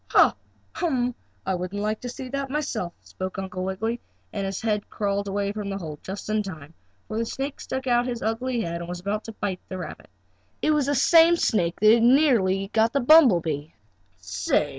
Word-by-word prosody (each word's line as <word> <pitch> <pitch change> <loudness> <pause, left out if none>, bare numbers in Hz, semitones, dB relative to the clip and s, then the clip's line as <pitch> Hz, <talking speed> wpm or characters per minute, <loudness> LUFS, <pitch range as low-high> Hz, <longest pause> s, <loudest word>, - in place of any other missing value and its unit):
"Ha! - - +5 0.4
Hum! 255 -8 0 0.3
I 190 - 0
wouldn't 180 +2 -3
like 215 +1 -1
to 245 - -5
see 255 +1 -7 0.2
myself!" 260 - -2
spoke 185 +1 -6
Uncle 185 -1 -4
Wiggily, 220 +5 -2 0.3
and 195 -2 -2
he 210 +2 0
crawled 200 -1 -1
away 200 0 -1
from 205 -1 -5
the 195 - -3
hole 155 -5 -7
just 195 +1 -7
in 215 0 +1
time, 160 -6 -8 0.3
for 220 - -3
the 230 - 0
snake 275 +3 -4
stuck 265 0 -4
out 245 -1 +2
his 240 -2 -3
ugly 235 +2 -1
head 170 -4 -3
and 170 0 -7
was 175 0 -4
about 205 +4 -3
to 225 - -6
bite 190 -3 -3
the 185 - -4
rabbit. 180 - -8 0.5
It 310 - +2
was 295 -3 +2
the 285 - +1
same 330 +5 +6
snake 180 - +1
that 215 +1 +7
had 235 - +4
nearly 230 -8 +4
caught 225 +2 +2
the 280 - +2
bumble 255 - +7
bee. 155 -1 -4 0.4
"Say!" 95 - 0
215 Hz, 200 wpm, -25 LUFS, 185-245 Hz, 0.5 s, that